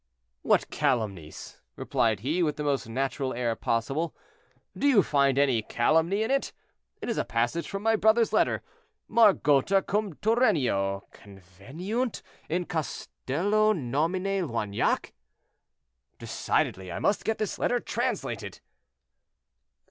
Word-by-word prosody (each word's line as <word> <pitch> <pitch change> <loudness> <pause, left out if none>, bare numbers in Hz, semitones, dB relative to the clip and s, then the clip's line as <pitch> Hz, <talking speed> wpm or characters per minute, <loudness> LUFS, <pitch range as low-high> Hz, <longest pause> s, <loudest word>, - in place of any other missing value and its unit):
"What - - +2
calumnies?" 95 -10 -2
replied 110 -4 0
he, 155 +9 0
with 150 -3 +1
the 150 - -4
most 140 -5 -1
natural 135 +2 -2
air 120 -2 -1
possible. 135 +10 -1 0.6
"Do 285 - +1
you 230 -9 +5
find 140 -3 +2
any 135 -5 +3
calumny 165 - +1
in 225 - -2
it? 275 0 0 0.5
It - - -3
is 230 - -1
a - - +1
passage 120 +8 -1
from 195 +1 -5
my 225 0 +3
brother's 220 +2 +3
letter—'Margota 195 - +2
cum 205 -3 -1
Turennio 140 - +1
conveniunt 135 - -5 0.3
in 175 +2 -1
castello 190 +6 0
nomine 180 - -1
Loignac!'—Decidedly 90 - -4
I - - -4
must 205 - +1
get 220 - -1
this 215 - -3
letter 245 - +1
translated." - - -3
150 Hz, 115 wpm, -27 LUFS, -, 0.6 s, you